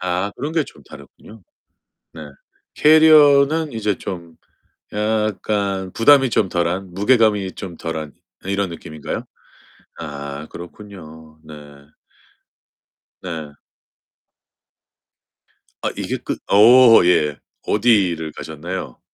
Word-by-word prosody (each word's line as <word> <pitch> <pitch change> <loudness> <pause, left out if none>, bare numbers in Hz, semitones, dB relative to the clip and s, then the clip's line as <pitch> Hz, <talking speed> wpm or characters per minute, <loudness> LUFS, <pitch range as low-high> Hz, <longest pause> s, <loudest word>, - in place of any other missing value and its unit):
아, 90 +3 -2
그런 145 +4 -4
게 160 -3 0
좀 - - -16
다르군요. 100 +10 -15 0.7
네. 80 - -10 0.5
캐리어는 155 -1 +5
이제 105 -3 -2
좀 85 -3 -8 0.6
약간 105 -3 -2
부담이 135 +2 +4
좀 100 -4 +1
덜한 90 +2 -3
무게감이 105 -2 +2
좀 85 -3 -8
덜한 80 -3 -6 0.3
이런 100 0 -2
느낌인가요? 80 -2 -7 0.7
아, 70 -1 -7
그렇군요. 80 -4 -12
네. 75 - -11 1.7
네. 80 -5 -7 2.3
아 - - -1
이게 - - -3
끝 - - -5
어 115 +1 +7
예. 75 -5 +2 0.3
어디를 95 -8 +1
가셨나요? 80 -3 -7
95 Hz, 185 characters per minute, -19 LUFS, 80-110 Hz, 2.3 s, 어